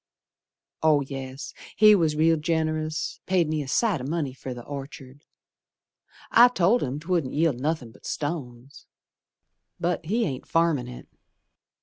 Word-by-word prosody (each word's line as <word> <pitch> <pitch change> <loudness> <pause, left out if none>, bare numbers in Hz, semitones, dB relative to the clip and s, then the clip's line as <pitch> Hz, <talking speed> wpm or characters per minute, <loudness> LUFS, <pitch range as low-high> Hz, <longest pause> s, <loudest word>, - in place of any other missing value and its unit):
Oh, 155 -2 +4
yes, 135 0 -7 0.2
he 215 0 +7
was 165 -6 +2
real 165 +2 +4
generous, 155 -1 -2
Paid 180 -3 +2
me 155 -1 -1
a 140 - -6
sight 190 - +1
o' - - -6
money 145 -1 -2
fer 130 0 -8
the 120 -1 -7
Orchard; 140 0 -9 1.1
I 240 +2 +8
told 230 0 +2
him 135 +2 -3
'twouldn't 165 -5 -1
yield 150 -5 +1
nothin' 145 -4 -2
but - - -13
stones, 140 -3 -5 0.9
But 175 0 -1
he 225 +5 +1
ain't 135 -5 -5
farmin' 165 -7 +1
it. 125 0 -10
155 Hz, 140 wpm, -25 LUFS, 135-170 Hz, 1.1 s, I